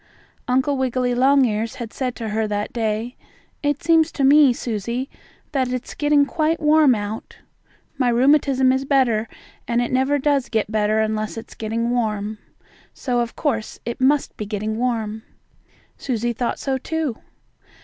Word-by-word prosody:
Uncle 260 +3 +1
Wiggily 255 -1 0
Longears 245 -4 +2
had 230 -2 -7
said 255 -2 -3
to 225 -2 -5
her 220 +1 -1
that 205 0 -3
day: 225 +1 -2 0.5
"It 290 +2 -1
seems 325 -1 +4
to 280 - -1
me, 285 0 +7
Susie, 235 +2 -3 0.4
that 260 -4 0
it's 255 -1 -4
getting 295 -1 +3
quite 310 +3 0
warm 300 -4 +5
out. 210 +1 -6 0.6
My 250 -2 +3
rheumatism 265 +1 +3
is 265 +1 0
better, 250 -5 +2 0.4
and 235 0 +1
it 240 - -1
never 265 +3 +2
does 280 -2 +1
get 220 -2 -1
better 215 0 +2
unless 215 0 -2
it's 225 - -8
getting 230 +2 -2
warm. 215 -3 -2 0.6
So, 245 -2 -1
of 235 0 -2
course, 230 -8 -2
it 235 +2 -5
must 280 +2 +2
be 210 - -5
getting 215 +1 -3
warm." 220 -3 -2 0.8
Susie 240 -2 -1
thought 240 +1 -2
so, 265 -1 -2
too. 310 -4 -3
245 Hz, 155 wpm, -21 LUFS, 220-275 Hz, 0.8 s, me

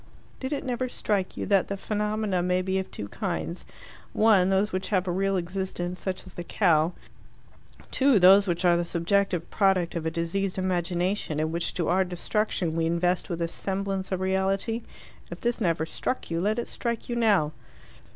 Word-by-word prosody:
"Did 260 +1 -4
it 285 - -2
never 255 0 -2
strike 200 -5 -1
you - - -2
that 200 0 +1
phenomena 210 -3 -1
may 180 +1 +1
be 190 +1 0
of 190 - -5
two 100 - -6
kinds: 80 -2 -4 0.5
ONE, 205 -4 +4
those 195 +2 +1
which 185 0 -2
have 185 -3 0
a - - +1
real 195 +2 +1
existence, 180 0 -3
such 190 -1 -4
as 185 - -12
the 175 - -6
cow; 170 -3 +2 1.0
TWO, 270 -3 +4
those 195 +2 +7
which 175 +1 0
are 175 -1 +6
the 170 - +1
subjective 175 +1 0
product 190 -4 +2
of 165 -1 -2
a - - +2
diseased 170 +4 -2
imagination, 180 -2 -1
and 155 +1 0
which, 170 +1 -1
to 170 -3 -1
our 185 +3 +3
destruction, 180 -1 -1
we 165 -1 +1
invest 175 +3 0
with 170 - -2
the 170 0 -1
semblance 195 +2 -3
of 185 -1 -1
reality? 190 +4 0 0.5
If - - -7
this 240 0 -1
never 165 -4 +1
struck 255 +5 -3
you, 165 0 0
let 210 +4 +1
it 240 - -2
strike 235 -2 -3
you 240 - -2
now." 205 -10 +3
185 Hz, 185 wpm, -27 LUFS, 175-200 Hz, 1.0 s, those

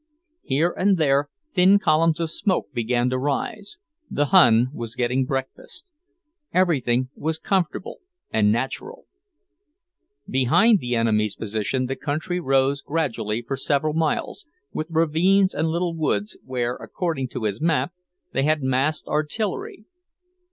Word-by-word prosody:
Here 155 +6 +1
and 195 0 +2
there 145 -2 +2 0.2
thin 190 +2 +6
columns 165 -3 +2
of 165 -2 -1
smoke 185 -5 -1
began 120 +1 0
to 130 - 0
rise; 200 - -3 0.3
the 145 - +1
Hun 125 -8 +6
was 115 -3 -6
getting 125 +1 0
breakfast; 135 - -6 0.6
everything 130 -9 +1
was 160 +1 -2
comfortable 185 -1 -2 0.3
and 105 -1 +3
natural. 135 - -3 1.2
Behind 135 - +4
the 125 -3 -2
enemy's 105 -2 +1
position 110 +4 -2
the 135 +1 -3
country 155 +6 -3
rose 135 -2 +1
gradually 120 -9 -2
for 135 +4 -3
several 145 +3 0
miles, 165 - -2 0.3
with 155 - -3
ravines 165 +5 +3
and 155 +2 0
little 170 +1 -1
woods, 105 -10 -1
where, 125 -2 -2
according 160 -8 -3
to 120 - -6
his 105 +2 -2
map, 165 +2 +1 0.4
they 135 - +1
had 150 0 +1
masked 135 +4 0
artillery. 190 +7 -2
145 Hz, 130 wpm, -23 LUFS, 125-165 Hz, 1.2 s, thin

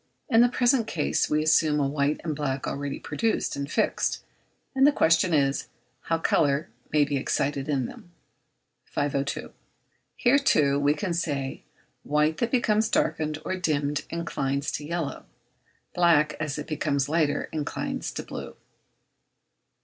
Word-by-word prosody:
In 230 -3 +6
the 245 - +5
present 245 -1 +2
case 155 -7 0
we 155 0 +2
assume 155 -1 +3
a 140 - +2
white 140 +1 0
and 155 -3 -2
black 140 -2 -2
already 140 0 -3
produced 225 -1 -1
and 140 +1 -4
fixed; - - 0 0.5
and 270 +1 +5
the - - +6
question 165 - +3
is, 140 -3 +1 0.4
how 165 - +1
colour 145 -4 +1 0.2
can 150 -1 +4
be 145 0 -1
excited 140 +1 -1
in 135 -4 +1
them? 175 - -11 0.7
502. 145 0 -2 0.6
Here, 255 +4 +4
too, 140 - +3
we 145 +1 +2
can 190 -2 -2
say, 140 -5 -2 0.4
white 150 +2 +1
that 235 - +1
becomes 220 -3 +2
darkened 155 -1 0
or 185 - -1
dimmed 150 -5 -1
inclines 140 -4 -2
to 150 - -4
yellow; 165 -1 -4 0.7
black, 165 -4 +3
as 155 -2 -3
it 150 - -5
becomes 145 -3 -1
lighter, 150 -2 +1
inclines 150 -2 -3
to - - -4
blue. - - -7
150 Hz, 145 wpm, -26 LUFS, 140-170 Hz, 0.7 s, In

